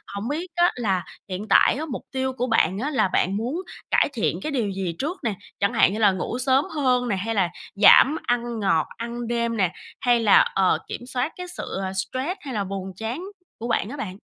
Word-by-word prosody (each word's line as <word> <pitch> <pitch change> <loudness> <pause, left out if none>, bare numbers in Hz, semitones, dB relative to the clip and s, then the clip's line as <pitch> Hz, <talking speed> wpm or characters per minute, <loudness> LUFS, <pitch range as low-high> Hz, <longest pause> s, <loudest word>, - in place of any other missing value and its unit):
hổng 200 +3 -4
biết 315 +6 -3
á 350 0 +4
là 195 -7 0 0.3
hiện 190 +3 -5
tại - - +5
á 305 +4 -3
mục 275 -6 -6
tiêu 265 0 -1
của 250 0 -2
bạn 190 -5 +2
á 275 +6 -1
là 275 -9 +2
bạn 190 +1 +1
muốn 255 - -2 0.3
cải - - +4
thiện - - 0
cái 310 - -3
điều 240 -7 0
gì 190 -3 -3
trước 330 +7 -3
nè? 225 - 0 0.3
Chẳng 200 +4 +1
hạn 220 -4 +4
như 215 - -3
là 210 -3 +5
ngủ 190 +5 -3
sớm 265 +2 +3
hơn 250 -4 +2
nè, 205 - +1
hay 225 +4 -2
là 190 -4 +2 0.3
giảm 240 +8 +7
ăn 240 -1 -1
ngọt, 190 -6 +2
ăn 235 +1 -5
đêm 235 -1 -1
nè, 185 -4 +2 0.3
hay 245 -2 +3
là, 215 -3 +6 0.2
ờ, 190 -1 +3
kiểm - - -6
soát 255 +3 -2
cái 360 0 -7
sự, 355 - -6 0.2
ờ, 190 0 -3
stress 255 - -3
hay 270 -3 -6
là 210 -3 -1
buồn 195 0 -5
chán 230 - -4 0.3
của 230 - -5
bạn 230 -3 0
á 285 - -7
bạn? 190 -7 -5
235 Hz, 230 wpm, -24 LUFS, 195-265 Hz, 0.3 s, giảm